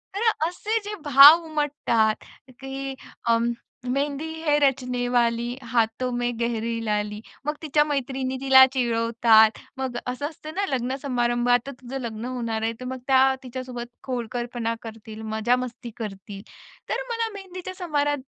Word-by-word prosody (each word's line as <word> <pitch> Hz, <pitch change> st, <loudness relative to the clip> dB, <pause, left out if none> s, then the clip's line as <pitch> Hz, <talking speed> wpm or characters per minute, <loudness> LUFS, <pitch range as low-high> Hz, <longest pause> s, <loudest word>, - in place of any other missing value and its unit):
तर 450 Hz, +3 st, +3 dB, 0.2 s
असे 425 Hz, +6 st, -1 dB
जे 420 Hz, 0 st, -4 dB
भाव 290 Hz, +4 st, +9 dB
उमटतात 290 Hz, -8 st, 0 dB, 0.4 s
की 270 Hz, 0 st, -5 dB, 0.3 s
अ, 230 Hz, 0 st, +5 dB, 0.5 s
मेहंदी 280 Hz, +3 st, -1 dB, 0.2 s
है 295 Hz, -1 st, +4 dB
रचनेवाली, 245 Hz, -3 st, +1 dB, 0.2 s
हाथों 235 Hz, +2 st, +1 dB
में 245 Hz, 0 st, 0 dB
गहरी 230 Hz, -1 st, -1 dB
लाली. 210 Hz, 0 st, -1 dB, 0.3 s
मग 300 Hz, 0 st, -1 dB
तिच्या 295 Hz, -1 st, +3 dB
मैत्रिणी 265 Hz, -1 st, -2 dB
तिला 265 Hz, -1 st, +8 dB
चिडवतात, 230 Hz, -2 st, +4 dB, 0.2 s
मग 260 Hz, -2 st, -3 dB
असं 255 Hz, +4 st, -2 dB
असतं 310 Hz, 0 st, -10 dB
ना 400 Hz, +1 st, 0 dB
लग्न-समारंभात, 245 Hz, -2 st, +1 dB
आता -, -, -4 dB
तुझं 265 Hz, +2 st, -5 dB
लग्न 225 Hz, -1 st, -5 dB
होणार 235 Hz, -3 st, -3 dB
आहे, 225 Hz, +1 st, 0 dB
तर 255 Hz, -, -7 dB
मग 260 Hz, +1 st, -4 dB
त्या 265 Hz, 0 st, +5 dB
तिच्यासोबत 250 Hz, -1 st, -6 dB, 0.2 s
खोडकरपणा 240 Hz, -1 st, -3 dB
करतील, 220 Hz, -1 st, -9 dB
मजा-मस्ती 240 Hz, +1 st, -1 dB
करतील. 195 Hz, -2 st, -7 dB, 0.5 s
तर -, -, -1 dB
मला 460 Hz, -1 st, -1 dB
मेहंदीच्या 370 Hz, -2 st, -7 dB
समार 305 Hz, -6 st, -1 dB
अ, 290 Hz, -, +1 dB
250 Hz, 140 wpm, -25 LUFS, 235-280 Hz, 0.5 s, भाव